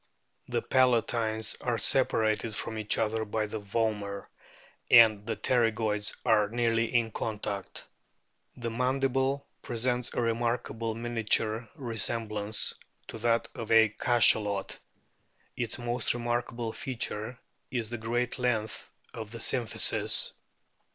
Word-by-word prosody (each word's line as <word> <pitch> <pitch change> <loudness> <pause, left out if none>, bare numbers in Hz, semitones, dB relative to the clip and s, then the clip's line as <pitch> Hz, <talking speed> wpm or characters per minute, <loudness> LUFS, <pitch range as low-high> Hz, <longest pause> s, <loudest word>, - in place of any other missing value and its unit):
The - - -1
palatines 115 -3 +2
are 120 -2 0
separated 110 -4 +1
from 110 0 -4
each 105 -1 +2
other 110 0 0
by 110 0 -1
the 105 +1 -5
vomer, 100 -1 -2 0.6
and 110 -3 +7
the 115 - -1
pterygoids 110 -4 +1
are 105 -2 +4
nearly 115 0 +1
in 115 -2 +2
contact. 105 -3 -4 0.7
"The 120 -2 -3
mandible 135 +2 0 0.2
presents 120 +1 -1
a - - +1
remarkable 115 -1 -1
miniature 115 -1 0
resemblance 110 -4 -1 0.4
to 115 - -6
that 115 0 +2
of 115 - -6
a 110 -1 +7
Cachalot." 105 -3 +2 0.8
Its 120 -2 -2
most 120 -1 0
remarkable 120 -1 -2
feature 120 -2 -3 0.3
is 120 -3 -3
the 120 - -4
great 120 +3 -1
length 110 -4 -1 0.2
of 110 -2 -6
the 115 - -7
symphysis. 115 +1 0
115 Hz, 115 wpm, -29 LUFS, 110-120 Hz, 0.8 s, and